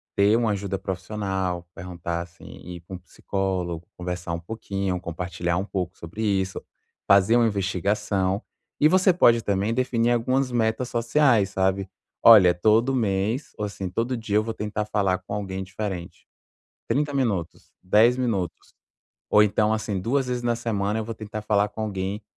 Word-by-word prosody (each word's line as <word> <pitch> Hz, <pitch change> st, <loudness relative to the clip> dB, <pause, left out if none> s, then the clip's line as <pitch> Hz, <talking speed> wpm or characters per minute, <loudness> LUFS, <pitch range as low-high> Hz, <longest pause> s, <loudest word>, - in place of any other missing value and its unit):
ter 105 Hz, +3 st, +4 dB
um 120 Hz, -, +1 dB
ajuda 100 Hz, -2 st, -2 dB
profissional, 95 Hz, -2 st, -3 dB
perguntar 85 Hz, -1 st, -5 dB
assim, 85 Hz, -1 st, -12 dB, 0.2 s
ir 90 Hz, -1 st, -8 dB
com 90 Hz, +1 st, -9 dB
psicólogo, 90 Hz, -5 st, -3 dB
conversar 90 Hz, -1 st, -4 dB
um 85 Hz, -, -2 dB
pouquinho, 95 Hz, -1 st, -3 dB
compartilhar 85 Hz, 0 st, -3 dB
um 95 Hz, -, -1 dB
pouco 90 Hz, -3 st, -4 dB
sobre 85 Hz, +7 st, -8 dB
isso, 95 Hz, -2 st, -1 dB, 0.4 s
fazer 100 Hz, +4 st, +5 dB
um 120 Hz, -1 st, +4 dB
investigação, 100 Hz, 0 st, -1 dB, 0.4 s
e 150 Hz, -, +6 dB
você 185 Hz, +2 st, +4 dB
pode 120 Hz, -9 st, +4 dB
também 100 Hz, +3 st, 0 dB
definir 120 Hz, -2 st, +1 dB
algumas 130 Hz, +2 st, +1 dB
metas 115 Hz, +1 st, 0 dB
sociais, 115 Hz, -3 st, +3 dB
sabe, 95 Hz, 0 st, 0 dB, 0.3 s
olha: 100 Hz, -6 st, +9 dB
"Todo 110 Hz, +8 st, +3 dB
mês 110 Hz, +4 st, -1 dB
ou 105 Hz, -, -2 dB
assim 95 Hz, -2 st, -5 dB
todo 115 Hz, +7 st, -1 dB
dia 110 Hz, -3 st, -3 dB
eu 110 Hz, -, +3 dB
vou 115 Hz, -, -4 dB
tentar 105 Hz, 0 st, -3 dB
falar 100 Hz, -3 st, +1 dB
com 95 Hz, -, -8 dB
alguém 95 Hz, -2 st, -4 dB
diferente, 95 Hz, -2 st, -6 dB, 0.6 s
30 145 Hz, 0 st, 0 dB
minutos, 105 Hz, -11 st, -2 dB
10 110 Hz, +6 st, +4 dB
minutos, 110 Hz, -9 st, -3 dB, 0.6 s
ou 105 Hz, -, +6 dB
então 105 Hz, +1 st, +2 dB
assim, 105 Hz, -3 st, -2 dB
2 130 Hz, +6 st, 0 dB
vezes 125 Hz, -1 st, -2 dB
na 120 Hz, -1 st, +1 dB
semana 110 Hz, -2 st, -1 dB
eu 110 Hz, -, -4 dB
vou 115 Hz, -, -5 dB
tentar 110 Hz, 0 st, -6 dB
falar 105 Hz, -1 st, +2 dB
com 110 Hz, -, -8 dB
alguém 100 Hz, 0 st, -3 dB
100 Hz, 160 wpm, -24 LUFS, 95-115 Hz, 0.6 s, olha